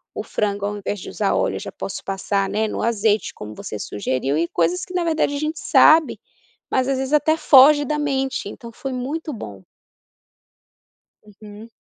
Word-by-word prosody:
o - - -4
frango 200 -1 -2
ao 205 - -4
invés 205 0 -4
de - - -8
usar - - -1
óleo - - 0
eu - - -4
já - - -7
posso - - -6
passar, 195 +1 -1
né, 220 +1 0
no - - -4
azeite 220 -2 +1
como 105 0 -9
você 105 - -7
sugeriu, 130 +7 -2
e 170 - +1
coisas 175 +2 0
que 365 - -11
na 360 - 0
verdade 315 -3 0
a - - -3
gente 305 +1 -3
sabe, 315 0 +5 0.5
mas 260 0 +1
às 275 - 0
vezes 265 +1 -3
até 300 +1 +3
foge 290 +1 +6
da 300 +3 -1
mente, 270 -5 -1
então 235 +2 -10
foi 265 +3 -6
muito 295 +5 -4
bom. 100 - -9 1.6
Uhum. 210 +1 -13
235 Hz, 190 wpm, -21 LUFS, 200-290 Hz, 1.6 s, foge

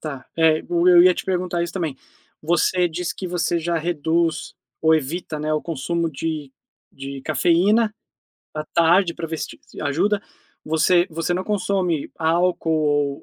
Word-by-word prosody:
tá. 140 -4 -7
É, 160 -1 +4
o 175 +1 +2
eu 175 -1 +8
ia 180 0 +6
te - - -5
perguntar 180 -2 -1
isso 170 - -4
também. 160 -8 -3 0.5
Você 175 +2 +2
disse 170 +1 -4
que 185 - -6
você 175 -1 0
já 170 0 -1
reduz 165 0 -1 0.3
ou 160 0 +4
evita, 155 +2 -3
né, 155 +1 -2
o 155 - 0
consumo 165 +2 -2
de 150 -2 -4 0.4
de 135 0 -7
cafeína 200 +9 +2 0.6
à 155 0 -4
tarde 170 +1 +4
pra 165 - -5
ver 160 0 -4
se - - -4
t - - -11
se - - -12
ajuda. 185 +8 +1 0.4
Você 175 +3 +3
você 165 +2 -2
não 185 +1 -2
consome 190 -6 -1
álcool 160 -4 +1
165 Hz, 165 wpm, -22 LUFS, 155-180 Hz, 0.6 s, eu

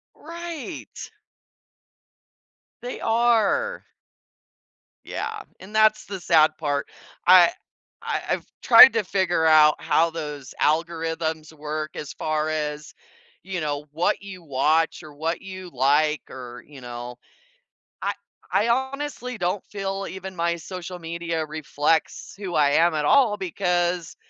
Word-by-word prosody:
Right. 335 -2 -8 1.7
They 245 +1 -6
are. 235 - +2 1.2
Yeah, - - -5 0.2
and 200 +3 -11
that's 215 0 +4
the 195 -1 -6
sad 160 -3 +4
part. 145 -2 -2 0.4
I 180 -1 +8 0.5
I - - -2
I've - - -1 0.2
tried - - +9
to 225 - +1
figure 180 -3 0
out 155 -1 +6
how 165 +1 +2
those 150 -4 -7
algorithms 160 0 -1
work 155 0 -5
as 150 - -6
far 155 0 -1
as, 150 -1 -4 0.5
you 185 -2 -4
know, 145 -1 -3
what 165 +5 0
you 190 -3 -10
watch, 155 +3 +1
or 155 -1 -12
what 160 +3 -3
you 185 -1 -8
like, 145 +4 +2
or 125 -2 -9
you 140 -3 -13
know 120 0 -7 0.9
I - - 0 0.4
I 225 - +2
honestly 265 -1 -2
don't 180 +1 -1
feel 195 -1 -4
even 190 0 -8
my 170 0 0
social 180 +1 -7
media 165 -1 -3
reflects 155 +1 -1
who 190 -4 -5
I 150 -2 +4
am 165 +2 +4
at 150 -1 -1
all 225 - +4
because 175 -3 -1
165 Hz, 125 wpm, -24 LUFS, 155-195 Hz, 1.7 s, tried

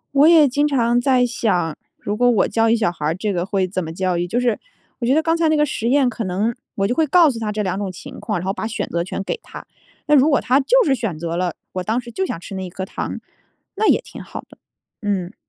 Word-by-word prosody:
我 280 +2 +6
也 320 -4 +7
经 285 +3 +1
常 240 -4 +2
在 255 -1 +3
想， 180 -9 -1 0.2
如 205 - -3
果 245 +2 +4
我 220 - +3
教 225 0 +2
育 230 - +4
小 220 - +1
孩 165 -3 -6
儿 155 - +1
这 205 +4 -2
个 175 -1 -1
会 195 -2 0
怎 185 0 -3
么 160 - -6
教 180 +1 -1
育， 175 - 0
就 235 - 0
是 245 -3 +1 0.4
我 240 - -2
觉 250 - +3
得 315 - +3
刚 325 +1 +1
才 330 -1 +2
那 310 - +3
个 300 - +4
实 235 -4 -2
验 270 -1 +3
可 230 -1 -4
能 205 +5 -1 0.2
我 195 0 +1
就 245 - -1
会 320 - +3
告 330 +2 +6
诉 250 - -3
他 220 -2 -2
这 210 0 -2
2 185 -1 -2
种 200 -2 -3
情 180 - -10
况， 210 -5 -2
然 175 - -6
后 195 - 0
把 220 - -4
选 225 0 -3
择 170 0 -1
权 190 - -4
给 - - -2
他， - - -10 0.4
那 300 - +5
如 285 +2 +5
果 280 - +3
他 255 +1 +2
就 - - +4
是 275 -4 +3
选 220 -10 -4
择 170 0 -3
了， 175 -1 -1 0.2
我 185 - -3
当 220 +6 0
时 240 -1 -9
就 380 - -1
想 170 - -4
吃 195 - -8
那 190 - -4
1 - - -7
颗 190 +2 -5
糖， - - -5 0.6
那 435 - +2
也 - - +4
挺 - - -11
好 - - -8
的。 - - -17 0.4
嗯。 200 -2 -2
225 Hz, 295 characters per minute, -20 LUFS, 185-265 Hz, 0.6 s, 也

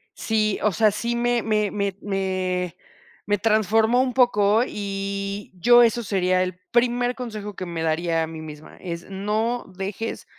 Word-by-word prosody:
Sí, 215 -2 0
o 210 - +3
sea, 215 +2 +3
sí 235 +3 -2
me 240 0 +1
me 210 -2 +1
me 200 -2 -1
me 185 -3 -2 0.5
me 205 0 +1
transformó 220 +3 +3
un 255 -2 -1
poco 220 -4 +4
y 200 -1 -4
yo 240 +7 +6
eso 235 +1 +2
sería 185 -2 +1
el 185 0 -2
primer 245 +1 +2
consejo 215 -5 -6
que 185 - -5
me 165 -2 -4
daría 165 +1 0
a - - -3
mí 160 -1 -8
misma. 150 -1 -11
Es, 170 -2 -6
no 215 +5 -1
dejes 195 +4 -5
205 Hz, 160 wpm, -23 LUFS, 185-225 Hz, 0.5 s, yo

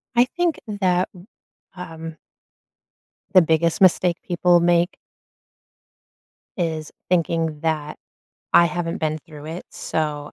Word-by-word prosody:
I 240 +1 +6
think 345 -3 +1
that, 185 -3 +1
w 180 -1 -14 0.5
um 165 -3 -8 1.2
the 185 - +8
biggest 165 +3 +1
mistake 180 -1 +4
people 175 0 +4
make 175 0 +2 1.6
is 160 -4 -2 0.2
thinking 165 -3 0
that 155 -2 -2 0.6
I 170 - +7
haven't 170 +3 -3
been 155 -1 -1
through 150 -1 -12
it, 165 +3 -6
so 150 -2 -3
170 Hz, 110 wpm, -22 LUFS, 160-180 Hz, 1.6 s, the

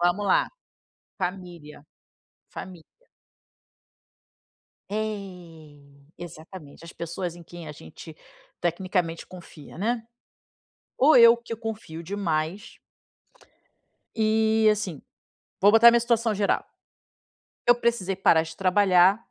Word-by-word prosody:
Vamos 175 +4 +1
lá. - - +2 0.7
Família. 175 -6 -6 0.7
Família. 180 -3 -10 2.1
É, 180 -8 -6 0.4
exatamente. 165 -2 -11
As 165 - -11
pessoas 170 +1 -5
em 175 - -12
quem 170 -1 -11
a - - -7
gente 150 - -13 0.4
tecnicamente 175 -1 -2
confia, 170 -5 -13
né. 230 +3 -1 1.0
Ou 295 +4 +6
eu 235 0 +8
que 235 -1 -7
confio 220 -7 -7
demais. 175 +1 -3 1.4
E, 220 0 +2
assim, 190 -8 -3 0.6
vou 200 +2 +5
botar 225 +2 +8
minha 235 - +4
situação 235 -1 0
geral. 200 0 0 1.0
Eu 240 - +7
precisei 235 -6 -1
parar 165 -4 +4
de 160 0 -10
trabalhar. 190 0 +4
185 Hz, 100 wpm, -25 LUFS, 165-215 Hz, 2.1 s, eu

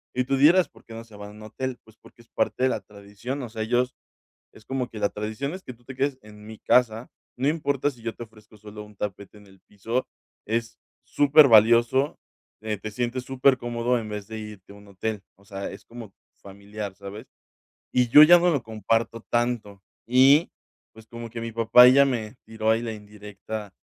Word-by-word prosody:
y 125 - +1
tú 135 +1 -1
dirás, 170 +6 +5
¿por - - -21
qué 115 - -12
no 115 - -8
se 110 -2 -17
van 105 0 -9
a - - -12
un 105 - -14
hotel?, 130 +3 -5
pues 110 0 -21
porque 120 - -19
es - - -33
parte - - -1
de 130 - +4
la - - -2
tradición, 105 +6 -8
o 120 - -7
sea, 110 0 -6
ellos 125 +3 0 0.6
es 110 - -18
como 130 -1 -3
que 110 - -10
la 100 - +2
tradición 110 +7 -5
es 190 - -9
que 125 - -9
tú 120 +1 -27
te 135 - -9
quedes 135 0 -1
en 105 0 -15
mi 110 0 -10
casa, 120 -1 +1 0.3
no 130 - -2
importa 145 -3 0
si 125 - -17
yo 115 0 -4
te - - -10
ofrezco 110 -1 -20
solo 105 0 -11
un 105 -1 -18
tapete 100 +1 -6
en 105 - -18
el 95 -1 -21
piso, 115 +5 -3 0.4
es 115 +1 -3 0.3
súper 145 0 +5
valioso, 120 +5 +4 0.4
eh, 110 -1 -3
te 110 +2 -7
sientes 125 +2 -3
super 130 0 +2
cómodo 120 0 -1
en 110 - -6
vez 105 -1 -6
de 110 0 -7
irte 105 -3 -10
a 100 - -14
un 100 0 -17
hotel, 100 +2 -4 0.2
o 100 - -24
sea, 100 -1 -6
es 100 - -12
como 115 -4 -11 0.3
familiar, 100 0 -8
¿sabes?, 100 +3 -10 0.7
y 125 -1 +2
yo 145 +6 +9
ya 175 +3 +8
no 175 +1 +2
lo 140 -7 -1
comparto 115 +1 -2
tanto 120 -5 -2 0.2
y 135 +6 +5 0.4
pues 110 0 -16
como 115 0 -8
que 115 +1 -7
mi 115 - -5
papá 115 +2 +7
ya 140 +2 +6
me 120 -3 -3
tiró 110 0 -1
ahí 115 +1 +1
la 115 -1 -4
indirecta 105 0 -9
115 Hz, 215 wpm, -24 LUFS, 105-125 Hz, 0.7 s, yo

